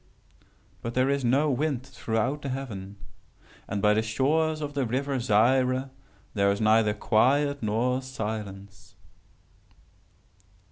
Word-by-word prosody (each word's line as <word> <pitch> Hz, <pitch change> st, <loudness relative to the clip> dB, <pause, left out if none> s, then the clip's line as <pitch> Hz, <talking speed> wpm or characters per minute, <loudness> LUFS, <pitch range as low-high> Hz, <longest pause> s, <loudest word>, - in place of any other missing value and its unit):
But 115 Hz, 0 st, -5 dB
there 130 Hz, +2 st, +2 dB
is 140 Hz, -1 st, 0 dB
no 140 Hz, +5 st, +2 dB
wind 135 Hz, -1 st, -1 dB
throughout 120 Hz, +2 st, -2 dB
the 140 Hz, -, -4 dB
heaven. 105 Hz, -7 st, -6 dB, 0.7 s
And 100 Hz, -1 st, -3 dB
by 105 Hz, 0 st, +5 dB
the 110 Hz, -, +2 dB
shores 150 Hz, +8 st, +1 dB
of 145 Hz, -1 st, -4 dB
the 140 Hz, -2 st, 0 dB
river 135 Hz, +3 st, -1 dB
Zaire 130 Hz, +4 st, +2 dB, 0.4 s
there 100 Hz, -1 st, +2 dB
is 100 Hz, -, -2 dB
neither 110 Hz, -1 st, +3 dB
quiet 140 Hz, +7 st, +2 dB
nor 120 Hz, +4 st, 0 dB
silence. 105 Hz, -5 st, -7 dB
125 Hz, 125 wpm, -27 LUFS, 110-135 Hz, 0.7 s, by